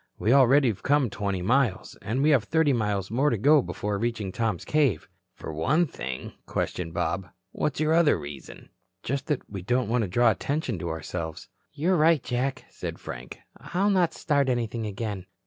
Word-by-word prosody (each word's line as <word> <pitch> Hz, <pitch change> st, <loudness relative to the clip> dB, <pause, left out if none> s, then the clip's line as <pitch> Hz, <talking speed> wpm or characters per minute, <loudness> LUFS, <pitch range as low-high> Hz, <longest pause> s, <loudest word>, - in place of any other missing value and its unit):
We 115 Hz, -, +2 dB
already 135 Hz, +1 st, +6 dB
have 105 Hz, -, -4 dB
come 140 Hz, -5 st, +2 dB
twenty 100 Hz, -3 st, -2 dB
miles, 120 Hz, -1 st, +1 dB
and 125 Hz, +6 st, -1 dB
we 155 Hz, -, +5 dB
have 130 Hz, -7 st, +3 dB
thirty 160 Hz, +2 st, +2 dB
miles 105 Hz, -4 st, -1 dB
more 135 Hz, +6 st, +2 dB
to 115 Hz, -, 0 dB
go 145 Hz, +7 st, +5 dB
before 105 Hz, -4 st, -3 dB
reaching 115 Hz, -4 st, -2 dB
Tom's 110 Hz, -4 st, -2 dB
cave." 145 Hz, -8 st, +1 dB, 0.3 s
"For 80 Hz, -, -7 dB
one 145 Hz, -, +2 dB
thing?" 65 Hz, -, -6 dB
questioned 85 Hz, -2 st, -3 dB
Bob. 85 Hz, +3 st, -1 dB, 0.2 s
"What's 150 Hz, -, -2 dB
your 155 Hz, +1 st, +2 dB
other 165 Hz, -3 st, +4 dB
reason?" 70 Hz, -1 st, -10 dB, 0.3 s
"Just 140 Hz, +2 st, -3 dB
that 150 Hz, -4 st, -2 dB
we 100 Hz, -2 st, -6 dB
don't 120 Hz, +4 st, 0 dB
want 120 Hz, +1 st, +2 dB
to 105 Hz, -, -1 dB
draw 120 Hz, +6 st, +4 dB
attention 135 Hz, -, -2 dB
to 85 Hz, -, -4 dB
ourselves." 80 Hz, 0 st, -5 dB, 0.2 s
"You're 170 Hz, +5 st, +1 dB
right, 155 Hz, -3 st, +4 dB
Jack," 130 Hz, +2 st, -2 dB
said -, -, -6 dB
Frank. 60 Hz, +1 st, -8 dB, 0.2 s
"I'll 180 Hz, -, 0 dB
not 180 Hz, -4 st, +2 dB
start 145 Hz, -3 st, +1 dB
anything 115 Hz, -2 st, -1 dB
again." 100 Hz, -2 st, -5 dB
120 Hz, 180 wpm, -26 LUFS, 100-145 Hz, 0.3 s, already